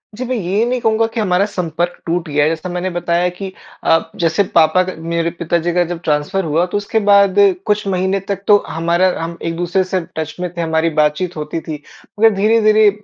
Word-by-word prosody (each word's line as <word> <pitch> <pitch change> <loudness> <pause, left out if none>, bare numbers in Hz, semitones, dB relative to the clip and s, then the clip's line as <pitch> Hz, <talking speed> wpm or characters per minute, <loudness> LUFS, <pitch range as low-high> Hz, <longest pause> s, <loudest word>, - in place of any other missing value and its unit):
जी, 255 +3 -4
मैं 255 +1 -2
ये 205 +2 0
नहीं 250 +1 -1
कहूँगा 225 -1 +2
कि 230 - -2
हमारा 190 -1 +2
संपर्क 175 -1 -2
टूट 170 0 -2
गया 145 0 +2
है। 155 - +3
जैसा 165 +3 -4
मैंने 180 +1 -2
बताया 175 0 0
कि 195 -1 -6 0.3
अ, 165 0 +2
जैसे 170 +4 +1
पापा 160 +4 +5
का 185 - -5 0.2
मेरे 170 0 0
पिताजी 170 0 0
का 175 0 +3
जब 170 0 -5
ट्रांसफर 150 +6 0
हुआ 160 +3 +1
तो 185 - -3
उसके 205 +2 -1
बाद 200 -1 +5 0.3
कुछ 210 -1 0
महीने 190 +1 0
तक 195 0 -3
तो 205 -1 +7
हमारा 170 +3 +1
हम 170 +1 -5
एक 165 0 -2
दूसरे 175 +2 0
से 185 0 -2 0.2
टच 160 -1 -4
में 180 -1 -2
थे - - -1
हमारी 160 0 +1
बातचीत 150 +4 0
होती 155 +2 -4
थी। 150 -2 -7 0.4
मगर 225 0 +7
धीरे-धीरे 215 0 +4
180 Hz, 210 wpm, -17 LUFS, 165-200 Hz, 0.4 s, तो